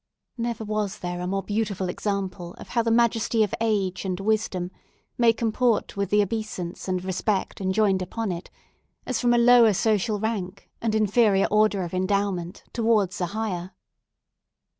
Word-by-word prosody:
Never 235 -1 -2
was 215 -1 -2
there 175 -2 -4
a 180 - -3
more 195 +1 -1
beautiful 205 -2 -2
example 185 -2 -3
of - - -11
how 235 - +1
the 230 - 0
majesty 230 -1 +3
of 210 - -2
age 200 -5 0
and 185 -1 -3
wisdom 195 -3 -1 0.4
may 235 -1 +5
comport 230 0 0
with 200 -2 -1
the 210 0 +4
obeisance 200 -5 -5
and 185 -1 -1
respect 190 +2 -1
enjoined 190 0 +2
upon 210 +3 -3
it, 175 0 -6 0.6
as 255 - -1
from 245 -1 +3
a 240 - +4
lower 235 -2 +6
social 210 +1 +1
rank, 200 -3 -4
and 225 -1 0
inferior 210 -2 +3
order 210 -2 +3
of 175 - -6
endowment, 185 -1 -1
towards 215 -5 +1
a 180 - +1
higher. 190 -3 -4
205 Hz, 160 wpm, -25 LUFS, 185-225 Hz, 0.6 s, lower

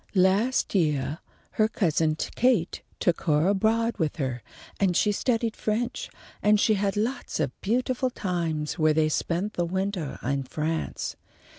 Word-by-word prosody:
Last 195 +7 +3
yeah 150 -5 +1 0.3
her 215 - +2
cousin 160 -7 +1
Kate 220 +2 +1 0.2
took 175 -2 +1
her 150 +1 +3
abroad 225 +3 +1
with 155 -4 0
her, 130 -5 -3 0.4
and 185 -3 +2
she 210 - +3
studied 230 +1 0
French, 230 +3 -2 0.3
and 210 0 +4
she 215 - +4
had 200 0 0
lots 240 0 -2
of 145 -5 0
beautiful 255 +4 0
times 170 -8 -2
where 155 -1 +4
they 155 -1 +3
spent 175 +7 -1
the 175 - 0
wintah 190 -3 -2
in 140 +2 0
France. 155 +4 -3
190 Hz, 145 wpm, -26 LUFS, 155-220 Hz, 0.4 s, and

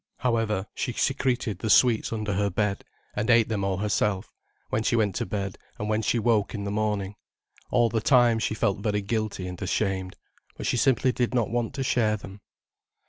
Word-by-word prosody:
However, 115 -5 0
she 125 - -3
secreted 130 -6 0
the 110 - -3
sweets 115 +1 +4
under 105 -2 -2
her 100 +2 +1
bed, 100 +1 -1 0.3
and 110 +3 -1
ate 115 -2 +5
them 105 -3 -1
all 95 -1 0
herself, 105 0 -1 0.4
when 110 - 0
she 120 +2 +1
went 105 -4 +2
to - - -2
bed, 100 0 -4 0.2
and 105 - -4
when 110 0 +1
she 115 - +1
woke 115 -2 +1
in 100 - -4
the 100 - -3
morning. 105 -2 -1 0.6
All 120 -1 +3
the 115 0 -1
time 120 -3 +4
she 110 - -1
felt 100 -3 0
very 105 -1 -1
guilty 110 -2 -2
and 90 -1 -7
ashamed, 95 -3 -1 0.4
but - - -5
she - - +1
simply 130 +1 +3
did 125 0 -1
not 115 -3 +1
want 120 +1 -1
to 135 - -2
share 110 -4 +2
them. 100 0 -11
110 Hz, 195 wpm, -26 LUFS, 100-120 Hz, 0.6 s, ate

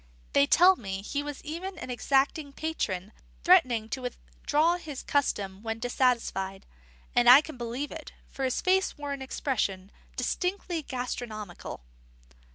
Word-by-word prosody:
They 140 - +5
tell 370 - +6
me 195 -2 -5
he 285 +7 -2
was 290 -1 -7
even 345 +5 -5
an 255 - -6
exacting 275 +3 +1
patron, 210 - -3 0.3
threatening 255 -12 +5
to 260 - -3
withdraw 300 +6 0
his 305 -6 -7
custom 200 -9 -1
when 225 0 -3
dissatisfied; 230 -6 0 0.5
and 245 0 +6
I 260 +4 +11
can 310 -1 -9
believe 245 +4 -4
it, 320 -1 -8 0.2
for 270 - -6
his 260 -1 0
face 375 +1 +2
wore 290 -1 -4
an 275 - -6
expression 210 -8 -2 0.2
distinctly 360 -2 -2
gastronomical. 240 - -5
260 Hz, 140 wpm, -28 LUFS, 225-310 Hz, 0.5 s, I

